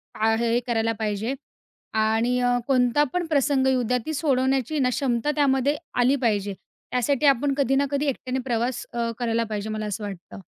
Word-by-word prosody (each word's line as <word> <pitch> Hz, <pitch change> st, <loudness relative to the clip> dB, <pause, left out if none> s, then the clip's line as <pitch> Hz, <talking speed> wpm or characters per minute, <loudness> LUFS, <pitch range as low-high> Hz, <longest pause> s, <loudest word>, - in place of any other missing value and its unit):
आ 225 Hz, +1 st, +2 dB
हे, 230 Hz, 0 st, 0 dB
हे 240 Hz, -, +3 dB
करायला 225 Hz, -1 st, +1 dB
पाहिजे 215 Hz, +3 st, -1 dB, 0.6 s
आणि 225 Hz, +3 st, +1 dB
अ, 245 Hz, 0 st, +2 dB
कोणता 255 Hz, +1 st, +3 dB
पण 360 Hz, -1 st, 0 dB
प्रसंग 280 Hz, -3 st, +2 dB
येऊद्या 250 Hz, -2 st, +2 dB
ती 315 Hz, -, -3 dB
सोडवण्याची 270 Hz, -1 st, +1 dB
ना 255 Hz, -, +2 dB
क्षमता 250 Hz, +1 st, 0 dB
त्यामध्ये 280 Hz, 0 st, +2 dB, 0.2 s
आली 255 Hz, +3 st, +4 dB
पाहिजे. 205 Hz, -3 st, 0 dB, 0.4 s
त्यासाठी 250 Hz, +4 st, +1 dB
आपण 275 Hz, 0 st, +3 dB
कधी 270 Hz, -2 st, +2 dB
ना 280 Hz, +1 st, +3 dB
कधी 285 Hz, +1 st, 0 dB
एकट्याने 260 Hz, -1 st, -2 dB
प्रवास 240 Hz, 0 st, -1 dB
अ, 235 Hz, -1 st, -1 dB
करायला 230 Hz, -1 st, 0 dB
पाहिजे 210 Hz, 0 st, -3 dB
मला 215 Hz, 0 st, -3 dB
असं 210 Hz, +1 st, -4 dB
वाटतं. 195 Hz, -1 st, -8 dB
250 Hz, 175 wpm, -24 LUFS, 225-275 Hz, 0.6 s, आली